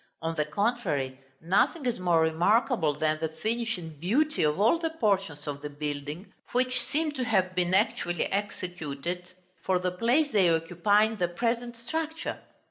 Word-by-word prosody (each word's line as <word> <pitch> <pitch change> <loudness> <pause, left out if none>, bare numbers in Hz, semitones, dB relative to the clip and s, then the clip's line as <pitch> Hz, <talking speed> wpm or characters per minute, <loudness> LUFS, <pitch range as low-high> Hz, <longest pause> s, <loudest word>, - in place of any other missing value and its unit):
On 165 0 -1
the 155 -2 0
contrary, 150 - -1 0.2
nothing 200 - +2
is 245 -5 0
more 175 -3 +3
remarkable 170 - +2
than 155 +1 0
the 160 - 0
finish 230 +8 -2
and 160 -4 -9
beauty 290 - +1
of 150 +2 +2
all 230 +11 +4
the 330 -1 -1
portions 195 - 0
of 145 -1 -5
the 150 - -5
building, 145 +4 -5 0.2
which 255 0 +2
seem 305 +5 0
to 265 -3 -3
have 190 -6 +1
been 180 0 +1
actually 195 -5 +1
executed 180 -4 -4 0.3
for 185 - +2
the 180 0 -1
place 245 - +2
they 195 -6 +4
occupy 175 +6 +3
in 220 0 -1
the 180 -3 +1
present 235 +6 -2
structure. 320 +7 -3
185 Hz, 165 wpm, -28 LUFS, 160-235 Hz, 0.3 s, all